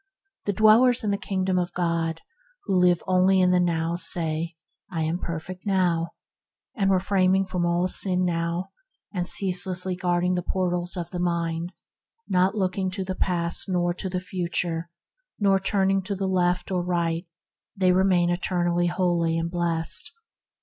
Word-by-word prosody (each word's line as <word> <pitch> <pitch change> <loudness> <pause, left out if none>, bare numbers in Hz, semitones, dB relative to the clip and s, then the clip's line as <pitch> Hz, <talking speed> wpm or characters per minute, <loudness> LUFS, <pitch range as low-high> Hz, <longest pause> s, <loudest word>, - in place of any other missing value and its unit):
The 205 - 0
dwellers 225 +5 +5
in 210 - 0
the - - +1
Kingdom 190 -1 -1
of 175 0 -3
God, 165 -2 -1 0.4
who 195 - -2
live 180 -1 +3
only 185 +1 +3
in 180 -1 +4
the 180 - +3
now, 170 -1 0
say, 165 -1 -1 0.3
"I 165 -3 -2
am 165 +3 -1
perfect 170 +2 -6
now"; 175 -4 +1 0.6
refraining 190 -1 +2
from 180 -2 -1
all 175 +1 +1
sin 185 0 +1
now, 170 +1 -2 0.4
and 180 -2 -2
ceaselessly 185 -1 +1
guarding 180 0 0
the 180 - 0
portals 180 0 -1
of 175 -1 -5
the 180 - -4
mind, 170 0 -2 0.5
not 185 +2 +2
looking 190 -1 -1
to 190 +1 -3
the 185 - -3
past 175 0 0
nor 175 -1 +1
to 190 +2 -4
the 180 0 -2
future, 175 -2 -2 0.5
not 195 -2 +2
turning 195 -1 +2
to 200 +2 -4
the 195 0 -3
left 180 -1 0
nor 180 -1 0
right, 170 -1 -1 0.5
they 185 -2 +3
remain 180 -2 +3
eternally 175 -1 0
holy 175 -2 +1
and 165 0 -2
blessed. 170 -2 +1
180 Hz, 155 wpm, -25 LUFS, 170-190 Hz, 0.6 s, dwellers